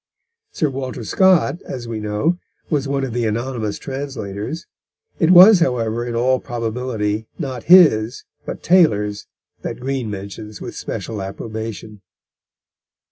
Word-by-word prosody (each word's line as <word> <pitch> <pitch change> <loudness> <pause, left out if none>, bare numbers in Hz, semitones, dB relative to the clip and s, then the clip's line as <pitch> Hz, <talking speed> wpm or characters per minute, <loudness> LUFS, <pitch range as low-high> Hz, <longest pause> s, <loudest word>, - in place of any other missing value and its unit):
Sir 160 - 0
Walter 130 -2 -5
Scott, 180 - +3
as 120 -3 -7
we 115 -2 -4
know, 105 +12 -1 0.3
was 145 -3 0
one 135 0 -1
of 130 -4 -3
the 120 -1 0
anonymous 115 -1 -2
translators; 135 -1 -5 0.5
it 165 -4 +3
was, 185 +3 +9
however, 120 -6 0
in 120 - -3
all 130 +2 +2
probability 115 -2 -3
not 130 -6 -5
his, 140 -10 +5 0.2
but - - -7
Taylor's, 105 - +3 0.3
that - - -5
Green 130 -2 -3
mentions 100 +1 -7
with - - -7
special 110 -3 -5
approbation. 110 +1 -6
120 Hz, 130 wpm, -20 LUFS, 110-140 Hz, 0.5 s, was